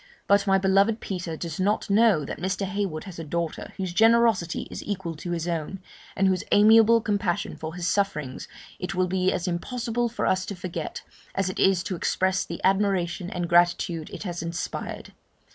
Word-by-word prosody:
But 200 0 +3
my 195 0 +5
beloved 195 +3 +3
Peter 175 -4 -4
does 165 0 -5
not 205 +3 +1
know 205 -7 +4
that - - -6
Mr. 190 +3 -1
Heywood 190 -5 -3
has 185 -4 -9
a - - -4
daughter, 170 +1 -3
whose 185 -2 -3
generosity 225 -4 +3
is - - -6
equal 190 -5 -4
to 175 - -7
his 170 -1 -2
own, 170 +2 -3 0.4
and 195 0 +3
whose 185 -2 +1
amiable 225 +2 +6
compassion 205 -5 -1
for 160 +1 -7
his 175 -1 -4
sufferings 165 -7 -1 0.3
it 185 +1 -4
will 185 0 +2
be 185 +1 +1
as 175 - -2
impossible 235 +6 -2
for 235 - -3
us 185 0 +2
to 200 - -4
forget, 170 -3 -5 0.3
as 190 -1 0
it - - -7
is 190 -2 +3
to 190 - -3
express 190 +2 0
the 170 - -7
admiration 190 -2 +1
and 175 -2 -3
gratitude 175 -1 +2
it - - -7
has 175 -3 -4
inspired. 170 0 -5
185 Hz, 185 wpm, -25 LUFS, 170-200 Hz, 0.4 s, amiable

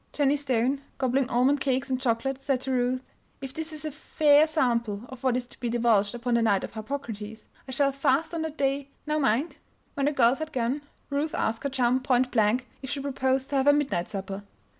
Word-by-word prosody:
Jennie 285 -1 +3
Stone, 270 -1 0 0.2
gobbling 260 0 +1
almond 265 +4 +3
cakes 265 -1 0
and 255 0 0
chocolate, 260 +2 0
said 270 -1 0
to 265 - -3
Ruth: 255 0 0 0.4
"If 270 -1 -7
this 320 0 -4
is 310 0 -6
a 310 - -2
fair 300 +1 +4
sample 235 -9 0
of 260 -1 -11
what 255 -2 +2
is 250 - -3
to - - -13
be 240 - -2
divulged 230 -3 +2
upon 240 0 -2
the 235 - +3
Night 205 -4 +2
of - - -5
Harpocrates, 220 -2 -6 0.2
I - - -6
shall 275 +2 +2
fast 275 +4 +1
on 330 - -2
that 315 -1 -4
day 275 0 0 0.2
now 305 0 0
mind!" 270 +4 +1 0.4
When 280 0 0
the - - +3
girls 255 -1 +3
had 315 0 -4
gone 255 +3 0 0.3
Ruth 300 +3 -1
asked 225 -7 -1
her - - +1
chum, 255 -1 +2
point 255 -1 +1
blank, 225 +2 +2 0.2
if 265 - -6
she 285 - -2
proposed 265 -1 0
to 280 - +2
have 270 +1 +2
a 290 - +8
midnight 275 -12 0
supper. 195 0 -5
260 Hz, 220 wpm, -27 LUFS, 240-280 Hz, 0.4 s, a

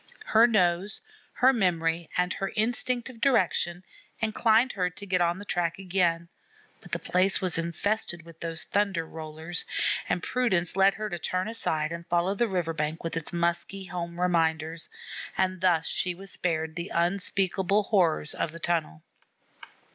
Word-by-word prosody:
Her 225 +2 +6
nose, 190 -2 +1 0.3
her 260 +2 +4
memory, 170 -6 0
and 180 +1 +1
her 195 - -3
instinct 240 +2 +1
of 230 -3 -17
direction 180 -8 +2 0.3
inclined 225 +2 +3
her 180 -2 -1
to 190 +3 -9
get 185 -2 +1
on 175 +1 +2
the 205 - -9
track 170 -3 -1
again; 175 -3 0 0.5
but - - -16
the - - +1
place 185 +2 +2
was 180 -3 +1
infested 175 +1 -1
with 165 -1 -14
those 165 -1 +2
Thunder 200 -5 0
rollers, 160 +2 -4 0.5
and 180 - 0
prudence 190 -10 0
led 195 0 +5
her 215 0 -3
to 175 -4 -5
turn 185 +4 -1
aside 160 -9 -1
and 170 0 -6
follow 175 +3 +1
the 235 +4 +1
river 175 -5 -1
bank 155 +1 -3
with 165 - -3
its 165 -2 -4
musky 170 +3 -1
home 175 -2 -5
reminders; 165 -2 0 0.5
and 185 -1 0
thus 175 -4 +3
she 180 -1 -1
was 195 +2 -8
spared 160 -2 -2
the 175 +2 -4
unspeakable 190 +2 +1
horrors 170 -7 +2
of 160 - -2
the 170 - -9
tunnel. 165 - -1
180 Hz, 160 wpm, -27 LUFS, 170-195 Hz, 0.5 s, Her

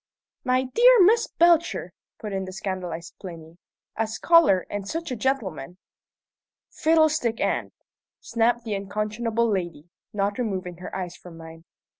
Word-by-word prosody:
"My 255 0 +2
dear 475 - +5
Miss 450 +5 +4
Belcher!" 340 0 +2 0.2
put 210 -3 -6
in 190 0 -2
the 185 - -7
scandalized 185 -4 -5
Plinny. 170 -2 -10 0.4
"A 225 0 -1
scholar, 220 - +4
and 205 -1 -5
such 330 -2 -4
a - - -1
gentleman!" 210 - -3 0.9
"Fiddlestick 310 -7 +2
end!" - - -1 0.5
snapped 235 +1 0
the 220 -2 -4
unconscionable 215 +4 -1
lady, 175 -5 -3 0.2
not 205 +2 -1
removing 185 -7 -3
her 180 - -8
eyes 180 -2 -5
from 175 -2 -13
mine. 165 0 -12
210 Hz, 135 wpm, -25 LUFS, 180-255 Hz, 0.9 s, dear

